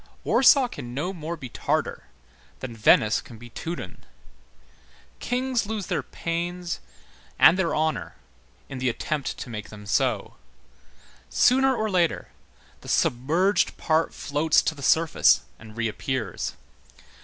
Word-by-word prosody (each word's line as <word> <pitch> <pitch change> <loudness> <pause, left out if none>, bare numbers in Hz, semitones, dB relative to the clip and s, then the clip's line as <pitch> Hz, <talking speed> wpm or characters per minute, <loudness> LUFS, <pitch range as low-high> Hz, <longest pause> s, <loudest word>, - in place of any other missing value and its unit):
Warsaw 265 0 +5
can 120 - -8
no 175 +7 -2
more 165 -1 -5
be 135 -5 -7
Tartar - - -2 0.5
than 120 -3 -7
Venice 110 0 +4
can 120 -4 -13
be 120 +1 -13
Teuton. 170 +8 -6 1.2
Kings 250 -3 -1
lose 215 -3 -3
their - - -1
pains 175 +1 -4 0.6
and 165 - +7
their 185 -3 0
honor 150 - -1 0.5
in 135 - -7
the 130 0 +1
attempt 145 +4 -3
to - - -7
make 105 -2 -6
them 105 -1 -11
so. 115 0 0 0.9
Sooner 265 +1 +4
or 220 -1 -1
later, 180 -5 0 0.5
the - - -11
submerged 170 +10 +1
part 160 +1 +1
floats 150 +2 +1
to - - 0
the 145 - -12
surface 160 +3 +4 0.2
and 110 0 -13
reappears. 115 -1 -3
155 Hz, 130 wpm, -25 LUFS, 120-180 Hz, 1.2 s, and